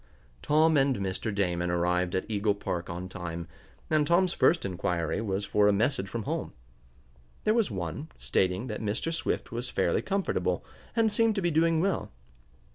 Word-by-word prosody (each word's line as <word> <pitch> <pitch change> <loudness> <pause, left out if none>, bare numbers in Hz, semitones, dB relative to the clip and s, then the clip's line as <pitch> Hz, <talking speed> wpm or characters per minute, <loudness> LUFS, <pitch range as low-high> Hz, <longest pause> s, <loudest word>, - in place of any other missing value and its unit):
Tom 155 +1 +4
and 135 -1 +3
Mr. 100 +3 -2
Damon 90 -3 0
arrived 90 +1 +1
at 95 - 0
Eagle 105 -1 +1
Park 90 -3 -4
on 90 +2 -5
time, 85 -3 -6 0.4
and 155 -2 +2
Tom's 175 +2 +3
first 170 - +3
inquiry 90 -1 -1
was 100 -2 -2
for 105 0 +3
a - - +6
message 100 0 0
from 115 0 -3
home. - - -3 0.9
There 215 - +3
was 230 -4 +2
one, 95 - -4
stating 95 +4 0
that 105 -4 -5
Mr. 110 +10 -1
Swift 160 0 -1
was 120 +2 -3
fairly - - +1
comfortable, 195 -1 -1 0.3
and 225 -2 +3
seemed 225 0 +3
to 200 - 0
be 175 - +2
doing 165 +1 +3
well. 195 0 -1
105 Hz, 170 wpm, -29 LUFS, -, 0.9 s, a